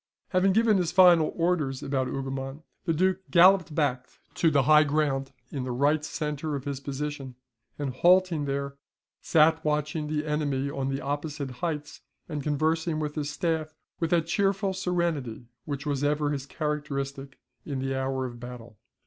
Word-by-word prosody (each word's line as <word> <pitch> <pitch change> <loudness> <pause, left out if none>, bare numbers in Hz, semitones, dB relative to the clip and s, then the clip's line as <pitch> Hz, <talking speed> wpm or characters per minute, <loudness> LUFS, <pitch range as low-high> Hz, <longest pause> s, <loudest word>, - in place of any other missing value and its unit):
Having 190 0 +3
given 220 -1 +4
his 175 -3 0
final 175 -4 +6
orders 165 -6 0
about 135 -2 -1
Hougoumont, 135 +2 -5 0.2
the 165 - +1
Duke 185 +3 +2
galloped 180 -2 +5
back 130 -5 0 0.2
to 165 - +3
the 140 -3 +3
high 150 +3 +6
ground 140 -3 0 0.2
in 135 -3 -3
the 130 - -3
right 145 +5 +2
centre 150 -1 -3
of 135 - -4
his 140 -2 -3
position; 140 -1 -5 0.4
and 140 -3 -3
halting 175 +1 +3
there, 140 0 -3 0.4
sat 160 0 +4
watching 150 0 -1
the 150 0 -2
enemy 145 -2 -1
on 135 -1 -2
the 135 +1 -2
opposite 145 -1 -3
heights, 150 -4 -3 0.3
and 150 -3 -4
conversing 155 +2 0
with 150 -1 -3
his 150 -2 -3
staff 155 -1 -2 0.2
with 165 - 0
that 170 -2 +2
cheerful 195 +2 +1
serenity 170 -11 -2 0.2
which 140 -1 -4
was 145 -1 -1
ever 145 0 +1
his 140 -1 -4
characteristic 140 -3 -4 0.3
in 140 -3 -4
the 135 0 -2
hour 130 0 -1
of 120 -1 -7
battle. 120 -2 -10
150 Hz, 165 wpm, -27 LUFS, 135-160 Hz, 0.4 s, final